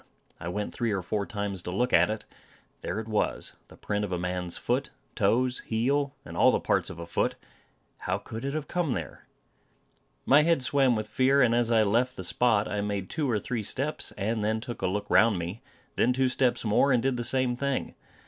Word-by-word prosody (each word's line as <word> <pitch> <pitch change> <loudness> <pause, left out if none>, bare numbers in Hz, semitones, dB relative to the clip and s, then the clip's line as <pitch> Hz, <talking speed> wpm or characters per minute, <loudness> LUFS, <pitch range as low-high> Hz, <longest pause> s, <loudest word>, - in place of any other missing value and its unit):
I 80 - -6
went 105 +4 -3
three 115 -2 -1
or 95 -3 -1
four 100 +2 -2
times 100 -5 -3
to 90 - -6
look 120 +7 0
at - - +5
it. 110 0 -4 0.6
There 95 - -3
it 110 - -6
was 110 -1 -1
the - - -16
print 105 0 -2
of 100 - -3
a 90 - 0
man's 90 0 -3
foot; - - -1 0.2
toes, 125 +1 +1
heel, 140 +5 0
and - - -9
all - - +5
the - - +1
parts - - 0
of - - -8
a 85 - -6
foot. 85 - 0 0.6
How - - -1
could 115 +2 -8
it 140 +2 -2
have 155 -2 -3
come 175 -7 0
there? 80 -6 -6 1.0
My 145 +3 +6
head 165 -4 +2
swam 135 -2 +3
with 110 -1 -3
fear; 130 +4 +3
and 115 -2 +3
as 120 -1 +2
I 115 -2 +4
left 120 +5 +1
the 95 - -5
spot, 110 +3 +2
I 105 - -2
made 100 -2 -3
two 150 -4 -1
or 115 - +2
three 115 +2 -3
steps, 135 +8 -2
and 105 +2 -2
then 110 +1 0
took 120 +1 -7
a - - +1
look 105 +2 -2
round 115 -4 +4
me; 90 +6 -5 0.4
then 125 - +3
two 130 0 +2
steps 125 -2 +1
more, 110 +6 +3
and 125 -2 +3
did 135 -1 +1
the 120 - -3
same 125 0 +2
thing. 140 +1 -2
115 Hz, 220 wpm, -28 LUFS, 105-130 Hz, 1.0 s, My